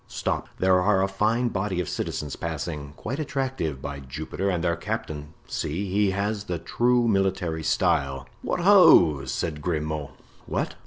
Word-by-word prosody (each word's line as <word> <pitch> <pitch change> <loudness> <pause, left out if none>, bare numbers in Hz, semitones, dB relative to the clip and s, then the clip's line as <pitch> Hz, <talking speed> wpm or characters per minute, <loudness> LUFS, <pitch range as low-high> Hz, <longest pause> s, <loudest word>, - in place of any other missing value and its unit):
Stop, - - -2
there 95 0 +4
are 95 0 +3
a - - +2
fine 110 +5 +1
body 95 -3 -2
of 90 - -2
citizens 75 -3 -3
passing; 75 -3 -5
quite 130 +7 -4
attractive, 130 - -2
by 70 -1 -5
Jupiter! 75 +8 -4
and 90 -3 -1
their 85 -1 +2
captain—see! 80 +3 -4
he 100 +1 +3
has 100 +2 -2
the 90 - -2
true 120 +8 +2
military 95 -5 +1
style." 70 -3 +1
"What, - - -2
ho!" 90 - +7
said 75 +4 -3
Grimaud. 75 -3 -2 0.4
"What?" - - -2
90 Hz, 150 wpm, -25 LUFS, 75-105 Hz, 0.4 s, ho